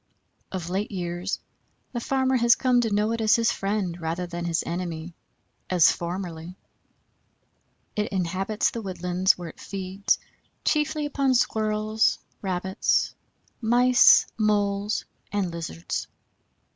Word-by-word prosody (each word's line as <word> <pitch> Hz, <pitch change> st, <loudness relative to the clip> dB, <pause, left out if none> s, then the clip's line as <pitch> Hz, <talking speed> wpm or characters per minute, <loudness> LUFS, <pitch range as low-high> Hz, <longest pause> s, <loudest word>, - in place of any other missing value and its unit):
Of 180 Hz, -3 st, -4 dB
late 195 Hz, +3 st, -1 dB
years 175 Hz, 0 st, -3 dB, 0.5 s
the 240 Hz, -, -3 dB
farmer 265 Hz, +1 st, +1 dB
has 235 Hz, -1 st, +5 dB
come 250 Hz, -2 st, +3 dB
to 225 Hz, -2 st, -1 dB
know 210 Hz, +2 st, +2 dB
it 230 Hz, 0 st, -1 dB
as 220 Hz, +1 st, +5 dB
his 230 Hz, 0 st, +3 dB
friend 195 Hz, -5 st, -2 dB
rather 165 Hz, +2 st, -2 dB
than 175 Hz, 0 st, -5 dB
his 170 Hz, -1 st, 0 dB
enemy, 170 Hz, -1 st, -4 dB, 0.6 s
as 180 Hz, -3 st, +6 dB
formerly. 175 Hz, 0 st, -5 dB, 1.4 s
It 210 Hz, 0 st, -1 dB
inhabits 190 Hz, +3 st, 0 dB
the 230 Hz, -, -5 dB
woodlands 185 Hz, -1 st, +1 dB
where 175 Hz, -2 st, -6 dB
it -, -, -14 dB
feeds 195 Hz, 0 st, -1 dB, 0.5 s
chiefly 300 Hz, 0 st, +1 dB
upon 275 Hz, -2 st, +1 dB
Squirrels, 215 Hz, -1 st, +1 dB, 0.2 s
Rabbits, 190 Hz, +1 st, 0 dB, 0.5 s
Mice, 245 Hz, +2 st, +6 dB
Moles, 205 Hz, -1 st, +1 dB, 0.3 s
and 200 Hz, -4 st, -1 dB
Lizards. 160 Hz, -, -4 dB
195 Hz, 120 wpm, -25 LUFS, 175-225 Hz, 1.4 s, as